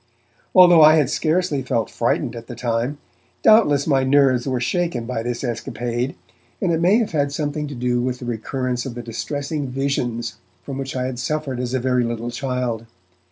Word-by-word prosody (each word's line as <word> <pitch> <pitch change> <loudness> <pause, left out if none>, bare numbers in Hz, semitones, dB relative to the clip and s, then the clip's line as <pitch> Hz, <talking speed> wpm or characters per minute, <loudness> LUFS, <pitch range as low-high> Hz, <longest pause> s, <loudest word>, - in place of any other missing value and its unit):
Although 175 -3 +8
I 155 +1 +8
had 145 -4 +2
scarcely 160 -3 0
felt 115 -3 -1
frightened 120 +1 -1
at 115 0 -9
the 120 - -7
time, 120 +4 -1 0.5
doubtless 150 -11 +5
my 135 -4 +2
nerves 130 -2 +3
were 130 -2 0
shaken 145 -2 -1
by 120 -1 -3
this 120 +2 -3
escapade, 120 +1 -3 0.4
and 185 - +1
it 165 0 +1
may 185 +5 +5
have 230 -3 0
had 145 -3 0
something 150 0 -2
to 145 - -7
do 120 0 0
with 125 0 -2
the 125 - -8
recurrence 125 +2 -2
of 120 - -7
the 120 - -6
distressing 140 +5 -4
visions 120 -4 -2 0.3
from 135 -1 -6
which 135 0 -5
I 130 - -1
had 130 -2 -4
suffered 135 -1 -2
as 125 0 -2
a - - +1
very 125 0 +1
little 120 0 -3
child. 125 -3 -3
130 Hz, 190 wpm, -21 LUFS, 120-145 Hz, 0.5 s, Although